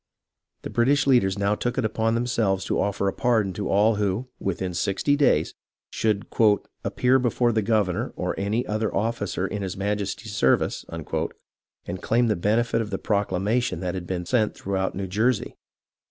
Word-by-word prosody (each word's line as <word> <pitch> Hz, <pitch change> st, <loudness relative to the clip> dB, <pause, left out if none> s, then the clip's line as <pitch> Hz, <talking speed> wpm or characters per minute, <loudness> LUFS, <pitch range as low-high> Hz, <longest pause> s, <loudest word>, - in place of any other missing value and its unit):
The -, -, -6 dB
British 135 Hz, +4 st, +3 dB
leaders 120 Hz, -9 st, +3 dB
now 100 Hz, +1 st, +1 dB
took 120 Hz, +3 st, -2 dB
it 130 Hz, -, +1 dB
upon 110 Hz, +1 st, 0 dB
themselves 115 Hz, -5 st, 0 dB
to -, -, 0 dB
offer 100 Hz, -1 st, 0 dB
a 95 Hz, -, 0 dB
pardon 110 Hz, -6 st, +1 dB
to 100 Hz, +1 st, -4 dB
all 105 Hz, +2 st, +3 dB
who, 105 Hz, +5 st, -1 dB
within 95 Hz, -1 st, -2 dB
sixty 100 Hz, -, +1 dB
days, 145 Hz, -1 st, +2 dB, 0.4 s
should 105 Hz, -2 st, 0 dB, 0.5 s
" -, -, -49 dB
appear 130 Hz, +1 st, +2 dB
be 125 Hz, -1 st, +1 dB
fore 120 Hz, +1 st, +1 dB
the 110 Hz, -1 st, +1 dB
governor 105 Hz, -4 st, 0 dB
or -, -, -2 dB
any 105 Hz, +5 st, -1 dB
other 110 Hz, 0 st, -1 dB
officer 105 Hz, -3 st, -1 dB
in 105 Hz, +1 st, -4 dB
his 95 Hz, -2 st, -4 dB
Majesty's 105 Hz, +2 st, -3 dB
ser 65 Hz, -9 st, +4 dB
vice -, -, -4 dB
" -, -, -22 dB, 1.0 s
and 90 Hz, +1 st, -5 dB
claim 120 Hz, +1 st, +2 dB
the 105 Hz, -, +2 dB
benefit 115 Hz, +5 st, +1 dB
of 110 Hz, -, -4 dB
the 100 Hz, -, -2 dB
proclamation 105 Hz, +4 st, 0 dB
that 90 Hz, -1 st, -2 dB
had 90 Hz, -2 st, -5 dB
been 90 Hz, -2 st, -3 dB
sent 110 Hz, +1 st, +1 dB
throughout 95 Hz, -1 st, -2 dB
New 95 Hz, +1 st, -3 dB
Jersey. 110 Hz, +5 st, 0 dB
105 Hz, 185 wpm, -25 LUFS, 95-115 Hz, 1.0 s, ser